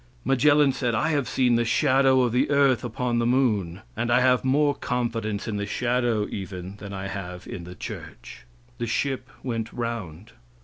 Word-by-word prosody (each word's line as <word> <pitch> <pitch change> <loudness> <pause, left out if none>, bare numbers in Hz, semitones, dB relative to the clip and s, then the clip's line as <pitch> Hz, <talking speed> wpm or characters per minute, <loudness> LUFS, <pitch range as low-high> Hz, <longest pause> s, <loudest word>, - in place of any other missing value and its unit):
Magellan 145 +2 +4
said: 125 -3 -1
"I 155 +8 +1
have 145 -6 0
seen 125 -2 +3
the 120 - +2
shadow 130 +3 +3
of 120 - +1
the 125 +4 +1
earth 140 -4 +3
upon 120 0 -1
the 120 - +1
moon, 105 -9 +1
and 120 +2 -2
I 120 - +5
have 125 -1 +3
more 145 +2 +3
confidence 115 -5 -2
in 105 -2 -2
the 100 0 -3
shadow 120 -2 0
even 95 0 -6
than 100 -1 -9
I 95 0 -5
have 90 -2 -6
in 85 - -7
the 90 +1 -9
church." - - -9 0.3
The 120 - -2
ship 130 +2 -1
went 115 -3 -3
round. 115 -5 -5
120 Hz, 180 wpm, -25 LUFS, 105-130 Hz, 0.3 s, I